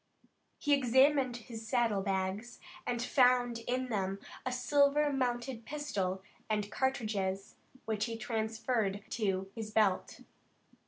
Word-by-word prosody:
He 290 - +2
examined 265 0 +4
his 225 -1 -9
saddle 225 -4 +2
bags, 195 +4 -2 0.3
and 240 -1 0
found 245 -2 +3
in 255 +1 -1
them 195 -3 -1 0.3
a - - 0
silver 285 +3 +3
mounted 245 -2 -1
pistol 205 -9 -2 0.3
and 210 -1 -1
cartridges 205 -7 -1 0.3
which 215 -2 0
he 230 -1 -4
transferred 220 -2 -1
to 195 -3 -1
his 220 -2 -5
belt. 210 -3 +1
230 Hz, 115 wpm, -33 LUFS, 205-255 Hz, 0.3 s, examined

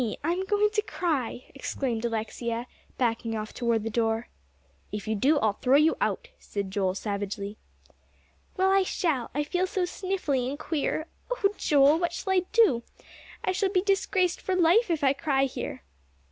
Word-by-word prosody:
I'm 350 +4 0
going 420 +1 +2
to 425 0 +1
cry," 300 - -2
exclaimed 255 -4 -3
Alexia, 230 +1 -2 0.3
backing 230 -2 0
off 215 0 -5
toward 235 -3 0
the 225 - -3
door. 225 +1 0 0.6
"If 210 0 -5
you 220 - +1
do, 275 +9 +3
I'll 220 -6 +2
throw 255 +6 +2
you 310 +2 +4
out," - - -1
said 200 -2 -4
Joel 190 -2 0
savagely. 200 0 -4 1.0
"Well, 380 +1 +3
I 390 0 +5
shall; 320 -9 -1
I 295 - +1
feel 360 +5 0
so 370 0 -1
sniffly 355 -9 -1
and 285 - -4
queer. 310 0 -1 0.2
Oh, 435 -5 +1
Joel, 290 0 +4
what 345 -1 0
shall 380 +1 -1
I 365 -1 +2
do? 435 - +4 0.6
I - - +1
shall 380 +1 +1
be 370 -2 +1
disgraced 385 -2 +1
for 375 - -1
life 365 +6 +4
if 320 -3 0
I 270 -1 +5
cry 275 -2 +1
here." 260 - -5
285 Hz, 170 wpm, -27 LUFS, 230-370 Hz, 1.0 s, I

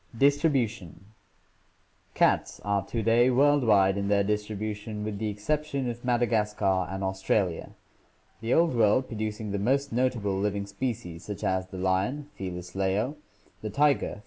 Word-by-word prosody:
Distribution. 125 - +1 0.5
— - - -39
Cats - - +2
are 100 -1 +1
to 115 -2 -2
day 120 +3 +4
worldwide 120 -8 +4
in 100 - -2
their 100 0 +3
distribution 105 +1 -3
with 105 -1 -4
the 110 -1 -1
exception 140 +6 -2
of 120 +1 -10
Madagascar 105 -6 +1
and 95 +1 -4
Australia, 95 -2 -1 0.7
the 115 +1 -3
Old 165 -1 +4
World 115 +2 +3
producing 110 -1 -4
the 100 - -1
most 140 +6 0
notable 115 -6 0
living 100 0 -1
species, 100 -7 -5
such 105 -2 -6
as 95 0 0
the 95 - -9
lion 95 +11 -1
(Felis 90 -1 -6
leo), 95 +8 0 0.5
the 110 - -4
tiger 140 +6 +2
(F. - - -13
105 Hz, 145 wpm, -27 LUFS, 100-125 Hz, 0.7 s, day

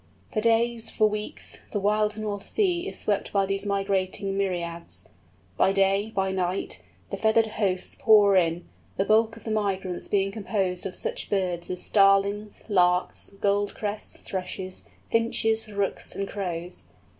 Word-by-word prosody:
For 215 - +1
days, 230 0 +2
for 215 - +3
weeks, 210 0 -5
the 205 - -1
wild 210 +1 +1
North 210 -2 -4
Sea 365 -3 +1
is - - -6
swept 205 -2 -1
by 200 -1 +2
these 195 +1 -1
migrating 195 0 0
myriads. 175 -3 -3 0.5
By 190 - +4
day, 195 +2 +2
by 190 -1 +1
night, 185 0 -2 0.3
the - - -2
feathered 220 +1 +4
hosts 200 -4 -2
pour 205 -3 +6
in; 170 -1 +2 0.3
the 195 - +2
bulk 225 +1 +3
of - - -14
the 220 - -4
migrants 195 -4 -1
being 195 -1 +1
composed 195 -3 -1
of 185 - -8
such - - -4
birds 180 -4 -1
as 180 0 -4
Starlings, 200 +1 +3
Larks, 180 -3 +2
Goldcrests, 205 0 -1
Thrushes, 185 0 -5 0.3
Finches, 225 -1 +1
Rooks, 200 -1 -2
and 195 - -2
Crows. 180 -3 -4
200 Hz, 145 wpm, -26 LUFS, 190-215 Hz, 0.5 s, pour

